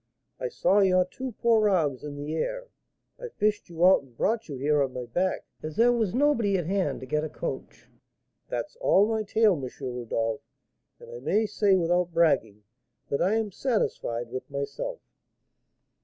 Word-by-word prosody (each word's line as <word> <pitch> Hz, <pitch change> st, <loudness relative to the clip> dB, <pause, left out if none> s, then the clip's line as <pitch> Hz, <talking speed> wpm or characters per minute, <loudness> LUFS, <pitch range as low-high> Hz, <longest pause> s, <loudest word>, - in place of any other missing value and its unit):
I 125 Hz, -, -2 dB
saw 185 Hz, +10 st, +2 dB
your 185 Hz, -2 st, +4 dB
two 255 Hz, +7 st, -7 dB
poor 220 Hz, -1 st, +3 dB
arms 150 Hz, -9 st, +1 dB
in 145 Hz, -1 st, -6 dB
the 145 Hz, +2 st, -5 dB
air. -, -, -3 dB, 0.5 s
I -, -, -6 dB
fished 210 Hz, -, -1 dB
you 170 Hz, +1 st, +1 dB
out 190 Hz, -, +6 dB
and 125 Hz, -4 st, -22 dB
brought 225 Hz, -3 st, 0 dB
you 140 Hz, -, -5 dB
here 145 Hz, +2 st, +2 dB
on 135 Hz, -2 st, -1 dB
my 125 Hz, -1 st, -5 dB
back, 180 Hz, +10 st, -1 dB, 0.2 s
as 155 Hz, 0 st, -6 dB
there 240 Hz, +1 st, +5 dB
was 225 Hz, -4 st, 0 dB
nobody 235 Hz, -8 st, +2 dB
at 175 Hz, -, -2 dB
hand 180 Hz, -7 st, -1 dB
to -, -, -6 dB
get 150 Hz, +3 st, -1 dB
a 155 Hz, -, -3 dB
coach. -, -, -6 dB, 0.6 s
That's -, -, -4 dB
all 205 Hz, -, +4 dB
my 220 Hz, 0 st, 0 dB
tale, 215 Hz, 0 st, +3 dB
M. 135 Hz, -6 st, -4 dB
Rodolph; 120 Hz, -4 st, -2 dB, 0.6 s
and 475 Hz, 0 st, -13 dB
I 480 Hz, -, -7 dB
may 220 Hz, -, +1 dB
say, 205 Hz, -2 st, +2 dB
without 175 Hz, 0 st, +1 dB
bragging, 110 Hz, -11 st, +2 dB, 0.5 s
that 140 Hz, -, -1 dB
I 195 Hz, +5 st, +2 dB
am 220 Hz, -2 st, -1 dB
satisfied 120 Hz, -, -2 dB
with 130 Hz, -, -6 dB
myself." 310 Hz, -, -4 dB
180 Hz, 180 wpm, -27 LUFS, 140-220 Hz, 0.6 s, out